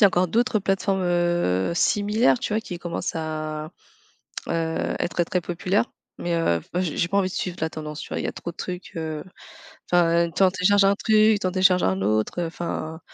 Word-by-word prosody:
y - - +10
a - - +8
encore 180 -1 +2
d'autres 235 +5 +2
plateformes, 195 -1 0
heu, 175 - +1
similaires 205 - +2
tu - - -3
vois? 215 - +1
Qui 180 -5 -7
commencent 175 0 -4
à, 155 -1 -4 0.8
heu, 165 -1 -1
être 175 0 0
très 180 +2 -1
populaires 180 +5 0 0.3
mais 175 - -2
heu, 85 - +1 0.2
j'ai 170 -1 0
pas 200 - 0
envie 190 -2 +2
de - - -9
suivre 180 -1 -3
la 160 - 0
tendance, 150 -1 -7
tu - - -8
vois? - - -3
Il - - -3
y - - 0
a - - -2
trop 170 - -7
de 170 - -25
trucs, 180 0 -6
heu, 160 -2 -4 0.7
enfin 170 -1 +4
tu 195 - +2
en 185 - +5
télécharges 195 +2 +4
un 200 +1 +4
truc, 215 0 +4
tu 190 - -1
en - - -1
télécharge 185 -1 +4
un 95 0 +1
autre, 110 - 0
heu, - - -1
enfin 160 -1 -5
175 Hz, 215 wpm, -24 LUFS, 160-190 Hz, 0.8 s, y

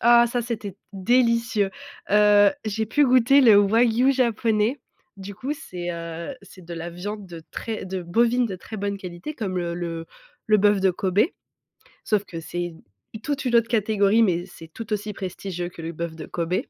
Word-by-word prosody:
ah 240 0 +7
ça 240 0 -1
c'était 220 -5 -5 0.2
délicieux. 230 0 +2 0.4
Heu, 205 -1 +6
j'ai 220 +1 -2
pu 290 +7 +3
goûter 255 +1 +5
le 225 -6 +7
Wagyu 230 +5 +4
japonais. 235 -1 +1 0.4
Du 195 +1 -8
coup 260 +8 -3
c'est, 180 - -6
heu, 170 +6 -6
c'est 185 -2 -15
de 170 0 -7
la 170 +1 -5
viande 200 +4 -6
de 170 -2 -10
très 220 -3 -5
de 185 -1 -4
bovine 235 +7 +2
de 190 -4 -5
très 220 - -9
bonne 200 0 -2
qualité 185 - -7
comme 190 -7 -3
le 170 -1 -4 0.4
le 215 -1 +5
bœuf 205 0 +4
de 190 - +4
Kobe. 185 +2 0 0.8
Sauf 210 -2 +1
que 165 - -7
c'est 175 +1 -4 0.5
toute 280 -2 -2
une 240 -1 +1
autre 230 -1 +4
catégorie 215 -1 +3
mais 175 -3 +1
c'est 165 -3 -12
tout 225 -1 -8
aussi 210 0 -3
prestigieux 180 -2 -5
que 170 - -11
le 165 +1 -4
bœuf 170 0 -5
de 160 - -8
Kobe 175 +1 -2
205 Hz, 180 wpm, -24 LUFS, 175-230 Hz, 0.8 s, ah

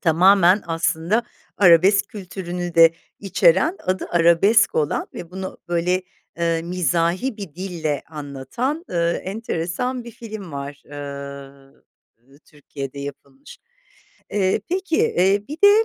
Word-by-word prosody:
Tamamen, 185 +3 +5
aslında 165 +5 0 0.4
arabesk 190 +2 +5
kültürünü 180 -4 -6
de 165 0 +7 0.3
içeren, 195 - +3
adı 185 +1 -1
Arabesk 175 +6 +4
olan 150 -2 0
ve 170 - -8
bunu 190 +1 -6
böyle, 175 +2 +1 0.4
eee, 165 -1 0
mizahi 175 +6 0
bir 195 -8 -8
dille 170 -6 -3
anlatan, 155 - -4
eee, 170 0 0
enteresan 220 +4 -3
bir 235 - -8
film 215 -6 -9
var, 140 0 -7
eee, 140 -2 -11
Türkiye'de 140 -2 -8
yapılmış. 140 -1 -10 0.7
Eee, 195 0 +1
peki, 365 -2 -1
eee, 200 - +2
bir 300 - -5
de, 415 +2 +7
175 Hz, 115 wpm, -22 LUFS, 155-200 Hz, 0.7 s, de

